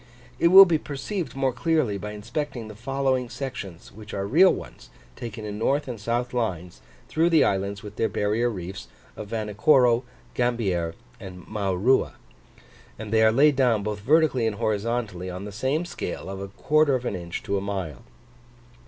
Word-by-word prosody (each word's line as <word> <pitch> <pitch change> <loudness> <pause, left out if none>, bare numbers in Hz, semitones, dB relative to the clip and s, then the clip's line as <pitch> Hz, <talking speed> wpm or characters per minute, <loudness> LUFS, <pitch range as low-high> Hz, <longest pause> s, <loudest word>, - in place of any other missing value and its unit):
It - - +5
will 190 +3 +10
be 165 -4 +1
perceived 155 +5 -5
more 135 -2 0
clearly 130 -7 0
by 105 +1 -6
inspecting 120 +3 -5
the 110 - -10
following 130 +1 -1
sections 100 -12 -7
which 105 +1 -10
are 100 0 -2
real 170 - +6
ones, - - -8 0.3
taken 115 -2 -7
in 105 0 -5
north 140 +6 +1
and 120 -4 -5
south 120 +3 -2
lines, 90 -8 -3 0.3
through 165 +2 +2
the 165 -2 +5
islands 100 +1 -1
with 105 0 -10
their 115 - +1
barrier 110 +4 0
reefs, 95 0 -7 0.3
of 105 - -7
Vanikoro, 115 +3 +3 0.3
Gambier, 100 -9 -1 0.2
and 90 -2 -10
Maurua; 100 +5 +1 0.8
and 110 0 -6
they 110 - +4
are 110 0 +6
laid 140 +5 +4
down, 120 -6 +2
both 105 0 -3
vertically 135 0 +3
and 110 - -2
horizontally, 105 -3 -2
on 90 +2 -6
the 105 - -7
same 135 - -1
scale 95 - -5
of 95 - -6
a 100 - -5
quarter 145 +7 +2
of 125 -1 -3
an 100 - -2
inch 85 -1 -6
to 100 - -2
a 95 - 0
mile. 95 -9 -4
110 Hz, 175 wpm, -25 LUFS, 100-135 Hz, 0.8 s, will